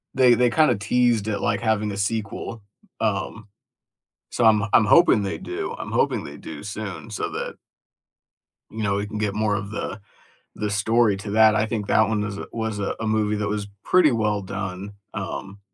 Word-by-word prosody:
They 125 -2 +6
they 125 +1 +3
kinda 150 -1 +4
teased 115 +1 +1
it 105 -2 -1
like 100 - 0
having 110 -2 0
a 100 - -5
sequel, 110 +2 -3 0.4
um, 105 0 -2 0.8
so, 120 - 0
I'm 110 -2 +5
I'm 110 - +6
hoping 170 -3 +5
they 100 0 -3
do. 390 +3 -5
I'm - - -6
hoping - - +1
they - - -9
do - - -9
soon - - -6
so 425 -1 -3
that 475 +3 -4 1.2
you 110 0 -4
know, 100 -1 +1
we 100 +1 -1
can 105 +1 -6
get 105 -1 -1
more 105 -1 +1
of 100 0 -4
the 105 -1 -5 0.6
the 105 - -2
story 105 +1 +2
to 100 +1 -6
that. 110 0 +5
I 110 - +2
think 110 -2 -3
that 110 -1 +4
one 105 -1 0
is 105 -1 -4
a - - -6
was 110 -2 -3
a 100 - -2
movie 110 -1 +1
that 105 -1 -1
was 105 0 -2 0.2
pretty 180 -5 +4
well 105 -3 0
done, 95 +1 -5 0.2
um, 100 0 -6
105 Hz, 190 wpm, -23 LUFS, 100-115 Hz, 1.2 s, They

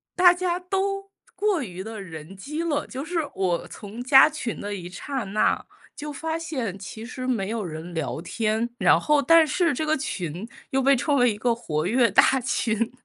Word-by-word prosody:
大 355 -1 +7
家 360 0 -1
都 390 +1 -2 0.3
过 410 -5 +1
于 185 -4 -7
地 220 +1 -7
人 165 -1 -9
机 300 +10 -4
了， 300 -3 -1
就 265 +1 -5
是 335 +2 -2
我 180 -3 -1
从 210 +3 -9
加 265 +2 +7
群 240 -6 -5
的 205 0 -4
一 175 -3 -7
刹 265 +8 -4
那， 200 +2 +1 0.3
就 295 0 -6
发 320 +3 -3
现 260 - -4
其 200 +3 -8
实 255 +2 -6
没 225 -7 -1
有 225 -2 -2
人 165 +1 -7
聊 160 0 -3
天， 220 +4 -1
然 185 -5 +5
后 300 +10 +3
但 330 +2 +6
是 335 +2 +1
这 295 - -2
个 310 - +2
群 185 - -4 0.2
又 270 0 +1
被 275 +1 +5
称 285 +3 +1
为 245 -3 +4
一 205 - -9
个 240 +2 +1
活 155 -9 -2
跃 235 +2 +3
大 265 +7 +5
群。 230 -2 0
245 Hz, 210 characters per minute, -25 LUFS, 195-305 Hz, 0.3 s, 大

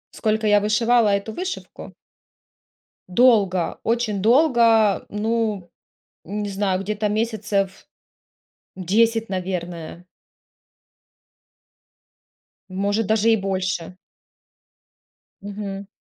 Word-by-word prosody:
Сколько 220 0 -1
я 205 -1 +5
вышивала 225 +1 +2
эту 205 +2 -4
вышивку? 370 +1 -7 1.1
Долго, 195 -5 +2
очень 225 -4 -1
долго, 230 -4 +4
ну 215 -3 -2 0.6
не 205 +3 -4
знаю, 195 -1 -1
где-то 210 +1 -2
месяцев 210 -3 -2 0.9
10, 225 +4 +1
наверное. 175 -2 -5 2.6
Может, 200 +3 -1
даже 220 +1 +2
и 220 - +4
больше. 190 -2 -3 1.5
Мгм. 200 -1 -6
205 Hz, 75 wpm, -22 LUFS, 190-225 Hz, 2.6 s, я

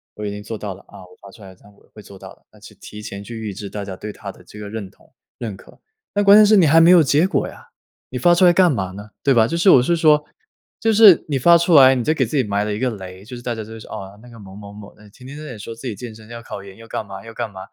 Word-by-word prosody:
我 105 - -7
已 100 - -3
经 105 0 -8
做 110 +1 -7
到 100 -2 -6
了 - - -15
啊， - - -15
我 90 0 -17
发 100 - -13
出 105 - -18
来 95 -1 -12
这 - - -27
样 100 0 -19
我 - - -27
会 105 - -13
做 100 -1 -14
到 - - -12
的。 - - -28
“那 - - -21
就 - - -15
提 105 - -11
前 100 -2 -8
去 115 +1 -9
预 110 -3 -6
支 100 +1 -8
大 105 0 -6
家 95 -1 -7
对 105 0 -8
他 100 -2 -9
的 - - -19
这 105 - -13
个 105 -1 -8
认 105 -3 -7
同、 - - -27 0.2
认 110 -5 -6
可。 - - -19 0.3
但 205 0 +1
关 200 +1 +7
键 215 - +7
是 215 +1 +4
你 185 - +5
还 160 +2 +5
没 165 - +6
有 180 -3 +7
结 150 +6 +2
果 - - -1
呀， - - -14 0.4
你 125 - -6
发 175 +8 +4
出 175 +2 +4
来 175 - +6
干 180 -2 +4
嘛 95 -8 -3
呢？ 105 +2 -11
对 140 - +3
吧？ 115 -3 +4
就 165 +9 -3
是 180 +3 +3
我 125 - +6
是 170 +5 0
说 150 -2 +3 0.6
就 225 0 +1
是 205 -6 +6
你 145 -3 -1
发 170 +7 +5
出 170 0 +2
来 135 -2 +7
你 125 - -2
就 155 - +1
给 135 -5 0
自 140 +6 -3
己 130 - +2
埋 100 -1 -2
了 105 0 -3
一 105 - -5
个 130 - 0
雷。 95 -2 -10
就 125 +2 -10
是 120 - -10
大 120 - -3
家 110 - -6
都 110 +1 -10
说： 110 - -13
“哦， 100 +1 -9
那 125 - -15
个 115 - -14
某 95 -2 -13
某 100 -1 -11
某， 105 0 -12
哎， 105 -1 -18
天 125 +5 -16
天 145 -4 -9
说 115 +2 -8
自 115 +4 -13
己 115 - -4
健 115 +1 -9
身， 110 0 -16
要 120 0 -9
考 100 -4 -9
研 95 -1 -14
要 115 0 -14
干 110 - -5
嘛 95 +2 -11
要 115 - -11
干 115 -2 -5
嘛， 95 - -11
115 Hz, 360 characters per minute, -19 LUFS, 100-145 Hz, 0.6 s, 关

